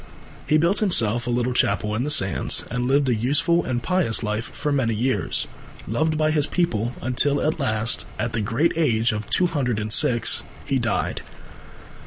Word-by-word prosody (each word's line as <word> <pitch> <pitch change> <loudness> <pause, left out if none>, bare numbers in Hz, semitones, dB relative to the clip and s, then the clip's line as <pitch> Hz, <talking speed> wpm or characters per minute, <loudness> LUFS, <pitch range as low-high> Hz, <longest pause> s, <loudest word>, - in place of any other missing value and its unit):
He 155 - +4
built 170 +6 +2
himself 120 - +1
a - - -1
little 120 +1 0
chapel 105 -2 0
in 115 +3 -1
the 145 - -2
sands 95 -11 +1
and 125 +1 -1
lived 140 +1 +2
a 125 - +2
useful 145 +9 +1
and 120 -2 -3
pious 180 -12 +1
life 105 +2 -2
for 150 - -4
many 125 -6 +1
years, 115 -4 -1 0.4
loved 155 +8 0
by 155 0 +2
his 150 -1 +1
people, 120 - -1
until 140 +3 +1
at 155 +1 -1
last, 115 -3 -1
at 115 +1 -3
the 115 - -1
great 115 +11 +1
age 120 -7 +2
of 105 -1 -5
two 185 - +3
hundred 135 -9 -1
and 105 0 -3
six, 120 0 +3 0.2
he 135 -1 0
died. 115 -2 -2
125 Hz, 185 wpm, -23 LUFS, 115-150 Hz, 0.4 s, He